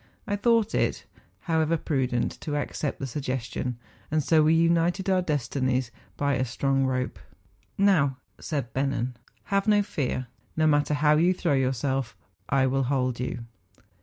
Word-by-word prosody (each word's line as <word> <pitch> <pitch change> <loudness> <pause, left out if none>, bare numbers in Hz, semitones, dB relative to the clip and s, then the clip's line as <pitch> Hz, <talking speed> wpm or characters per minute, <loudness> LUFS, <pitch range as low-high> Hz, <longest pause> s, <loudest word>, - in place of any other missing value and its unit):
I 205 -3 -1
thought 225 +1 +2
it, - - 0 0.4
liowever, 160 0 +2
prudent 130 -5 0
to 150 -2 -3
accept 145 0 -2
the 135 - -3
suggestion; 130 -2 -3 0.3
and 155 -1 +1
so 160 +2 +4
we 155 +1 +4
united 170 +3 +2
our 185 -1 +3
destinies 130 -5 -1 0.3
hy 140 -1 +1
a 130 - +1
strong 135 +2 0
rope. 130 -1 -2 0.6
'Now,' 160 -10 +3 0.2
said 140 -6 -3
Bennen, 130 -2 -1 0.2
' - - -39
have 195 +1 +2
no 205 -1 +4
fear; 130 -7 -2 0.3
no 155 - +3
matter 145 -1 +3
how 150 +1 +4
you 175 +3 +3
throw 170 -4 0
yourself, 130 -3 0 0.3
I 135 0 +3
will 135 0 +1
hold 130 -2 0
you. 120 -1 -4
140 Hz, 155 wpm, -26 LUFS, 130-165 Hz, 0.6 s, so